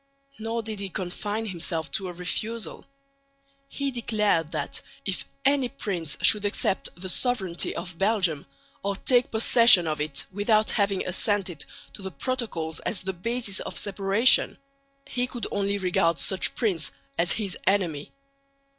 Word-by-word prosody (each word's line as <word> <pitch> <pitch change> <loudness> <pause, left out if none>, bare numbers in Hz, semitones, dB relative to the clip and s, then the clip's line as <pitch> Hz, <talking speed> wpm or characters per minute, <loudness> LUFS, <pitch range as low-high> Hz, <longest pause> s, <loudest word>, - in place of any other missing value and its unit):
Nor 225 +1 -2
did 215 -2 -4
he 200 -1 -3
confine 205 +5 -3
himself 170 -4 -2
to 195 -3 -1
a - - -6
refusal. 215 +6 -3 0.8
He 280 -1 -2
declared 210 - +1
that - - -3 0.2
if - - -2 0.2
any 275 -2 +3
prince 180 - -3
should 210 -2 +6
accept 200 -2 0
the 185 - -5
sovereignty 190 -3 0
of 175 -1 -6
Belgium 190 -8 +1 0.3
or 200 0 -1
take 245 +4 +3
possession 225 -4 +6
of 155 -1 -2
it 150 -2 -2
without 215 +2 +2
having 200 -2 +1
assented 185 -4 -1 0.3
to - - -10
the 190 - -4
protocols 185 -8 -3
as 215 - -2
the 190 +1 -3
basis 225 +2 -1
of - - -5
separation 200 +4 +3 0.5
he 250 0 -1
could 245 -2 -5
only 200 0 0
regard 180 -3 +2
such 190 +1 -1
prince 185 - +1 0.3
as 175 +2 +3
his 200 -5 -2
enemy. 175 -7 +1
200 Hz, 145 wpm, -26 LUFS, 175-225 Hz, 0.8 s, should